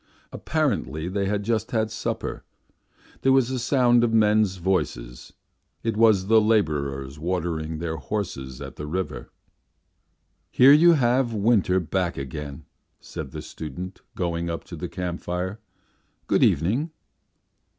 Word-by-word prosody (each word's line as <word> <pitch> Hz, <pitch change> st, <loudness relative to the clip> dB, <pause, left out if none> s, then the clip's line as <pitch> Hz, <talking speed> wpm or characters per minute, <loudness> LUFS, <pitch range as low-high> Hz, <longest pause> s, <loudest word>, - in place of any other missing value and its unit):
Apparently 75 Hz, +6 st, -1 dB
they 100 Hz, +1 st, -1 dB
had 105 Hz, 0 st, -1 dB
just 110 Hz, 0 st, -1 dB
had 110 Hz, -2 st, 0 dB
supper. 110 Hz, -, -4 dB, 0.8 s
There 135 Hz, -, +3 dB
was 130 Hz, -2 st, +3 dB
a 130 Hz, -, -1 dB
sound 120 Hz, -1 st, +3 dB
of 120 Hz, -, +2 dB
men's 105 Hz, -3 st, +3 dB
voices; 75 Hz, -10 st, -2 dB, 0.5 s
it 115 Hz, -2 st, -1 dB
was 110 Hz, -4 st, +4 dB
the 110 Hz, +2 st, +5 dB
labourers 75 Hz, -10 st, 0 dB
watering 80 Hz, -2 st, -2 dB
their 80 Hz, 0 st, -3 dB
horses 70 Hz, -7 st, -5 dB
at -, -, -8 dB
the 75 Hz, -, -6 dB
river. 95 Hz, +4 st, -4 dB, 1.2 s
"Here 135 Hz, +3 st, +7 dB
you 170 Hz, +3 st, +7 dB
have 125 Hz, -4 st, +2 dB
winter 100 Hz, -3 st, +3 dB
back 90 Hz, 0 st, -2 dB
again," 70 Hz, +1 st, -6 dB, 0.3 s
said -, -, -7 dB
the -, -, -7 dB
student, 90 Hz, +5 st, -7 dB
going 85 Hz, -1 st, -2 dB
up 85 Hz, -, -4 dB
to -, -, -9 dB
the -, -, -5 dB
camp 90 Hz, -1 st, -4 dB
fire. 90 Hz, +4 st, -3 dB, 0.7 s
"Good -, -, +2 dB
evening." 120 Hz, -, +2 dB
95 Hz, 135 wpm, -24 LUFS, 80-115 Hz, 1.2 s, Here